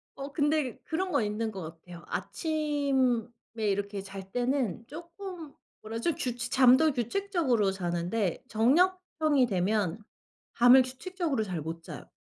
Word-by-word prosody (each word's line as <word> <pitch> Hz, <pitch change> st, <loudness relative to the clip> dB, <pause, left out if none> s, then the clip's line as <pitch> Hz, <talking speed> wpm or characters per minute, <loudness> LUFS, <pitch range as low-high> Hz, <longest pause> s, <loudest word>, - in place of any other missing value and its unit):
어 275 Hz, +1 st, -6 dB
근데 295 Hz, -4 st, +1 dB
그런 365 Hz, +3 st, -2 dB
건 220 Hz, -, +2 dB
있는 215 Hz, +2 st, -2 dB
것 190 Hz, -2 st, -7 dB, 0.2 s
같아요. 175 Hz, 0 st, -12 dB
아침에 270 Hz, -, 0 dB, 0.3 s
이렇게 200 Hz, -1 st, -1 dB
잘 195 Hz, -1 st, -9 dB
때는 245 Hz, -, -1 dB
쪼끔 340 Hz, 0 st, -9 dB, 0.3 s
뭐라 220 Hz, +1 st, -5 dB
그러죠? 335 Hz, +7 st, +1 dB
규칙 240 Hz, -1 st, -3 dB
잠도 265 Hz, +4 st, +6 dB
규칙적으로 260 Hz, -, 0 dB
자는데 175 Hz, +2 st, -2 dB
저녁형이 310 Hz, +3 st, +3 dB
되면 195 Hz, 0 st, 0 dB, 0.6 s
잠을 245 Hz, +2 st, +8 dB
규칙적으로 275 Hz, -, -2 dB
잘 180 Hz, -6 st, -4 dB
못 165 Hz, +2 st, -6 dB
자요. -, -, -9 dB
245 Hz, 280 characters per minute, -29 LUFS, 200-300 Hz, 0.6 s, 잠을